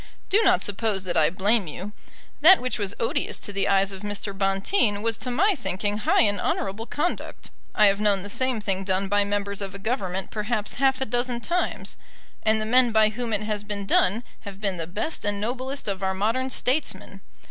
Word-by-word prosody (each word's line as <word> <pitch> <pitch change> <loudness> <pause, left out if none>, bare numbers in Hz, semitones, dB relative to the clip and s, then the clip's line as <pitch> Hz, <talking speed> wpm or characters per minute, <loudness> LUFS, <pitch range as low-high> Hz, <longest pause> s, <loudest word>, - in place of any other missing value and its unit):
"Do 410 +4 +5
not 370 -3 +4
suppose 205 -1 -1
that 180 -2 -2
I 155 -1 +4
blame 200 +3 +2
you. 185 +7 -7 0.5
That 365 +5 +8
which 250 -2 -2
was 200 -1 -1
odious 230 - 0
to 205 - -8
the 195 - +1
eyes 195 0 +2
of 190 -1 -8
Mr. 205 -1 -4
Bonteen 200 - +1
was 230 -1 +1
to 255 - -4
my 375 - +3
thinking 205 - -2
high 215 - +3
and 205 -3 +1
honourable 205 +4 -2
conduct. 310 +4 -4 0.2
I 215 - +6
have 200 0 +3
known 205 -3 +2
the - - -4
same 255 +3 -1
thing 195 -2 -2
done 190 0 -1
by 205 +1 +2
members 200 0 -2
of 195 -1 -5
a - - -4
Government 195 -4 -3
perhaps 215 0 -2
half 265 -1 +2
a - - +1
dozen 245 +1 0
times, 345 +9 -2 0.4
and 220 0 +2
the 215 - -2
men 245 +1 +5
by 220 -1 +4
whom 235 +2 -5
it 210 -1 0
has 210 -1 -3
been 205 -1 -4
done 200 +4 +2 0.2
have 200 -2 -10
been 195 -3 0
the 165 -1 -4
best 210 - -4
and 205 -1 -1
noblest 255 +5 -4
of 195 -1 -3
our 190 0 -1
modern 230 +7 0
statesmen. 210 -8 -2
210 Hz, 210 wpm, -24 LUFS, 195-240 Hz, 0.5 s, That